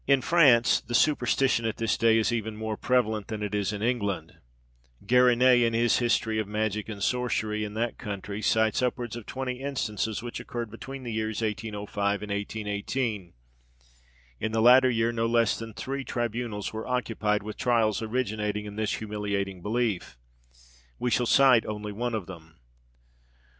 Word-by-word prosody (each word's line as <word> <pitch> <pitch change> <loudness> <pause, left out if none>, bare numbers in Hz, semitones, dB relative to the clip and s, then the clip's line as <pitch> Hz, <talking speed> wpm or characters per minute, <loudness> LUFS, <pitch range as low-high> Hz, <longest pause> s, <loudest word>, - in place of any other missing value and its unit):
In 135 -1 +4
France, 135 -9 +5
the 120 - -4
superstition 135 -3 +2
at 110 - -3
this 115 -1 0
day 115 -1 +4
is 110 +1 +2
even 110 -2 -3
more 110 0 -3
prevalent 110 -4 0
than 110 -2 -4
it 105 -1 -4
is 105 -1 0
in 105 0 -4
England. 105 -6 -1 0.7
Garinet, 125 +1 +5
in 115 -1 +2
his 120 +1 +3
history 110 -2 +1
of 110 - -2
Magic 105 0 -2
and 100 -2 -5
Sorcery 110 -4 0
in 105 0 -6
that 115 +1 -2
country, 100 0 -5
cites 110 +1 +2
upwards 120 -2 -2
of 120 -3 -8
twenty 130 -1 -4
instances 110 -6 -2
which 120 - -5
occurred 120 -3 -5
between 130 +4 -8
the 120 -2 -4
years 110 0 -2
1805 105 -1 -2
and 105 - -6
1818. 105 0 -3 1.1
In 110 - -2
the 110 - 0
latter 125 +3 +7
year 115 -1 +1
no 115 -1 0
less 115 -1 +2
than 115 0 -7
three 135 +6 -4
tribunals 120 -4 -3
were 110 +2 -5
occupied 110 -4 -1
with 105 0 -6
trials 115 -4 +1
originating 110 -3 -2
in 105 0 -8
this 110 -1 -1
humiliating 100 -3 -3
belief: 105 - -2 0.8
we 125 - -1
shall 120 0 +2
cite 130 -4 +6
only 105 0 -4
one 120 +3 -2
of 105 -5 -3
them. 85 -3 -12
110 Hz, 165 wpm, -27 LUFS, 105-120 Hz, 1.1 s, latter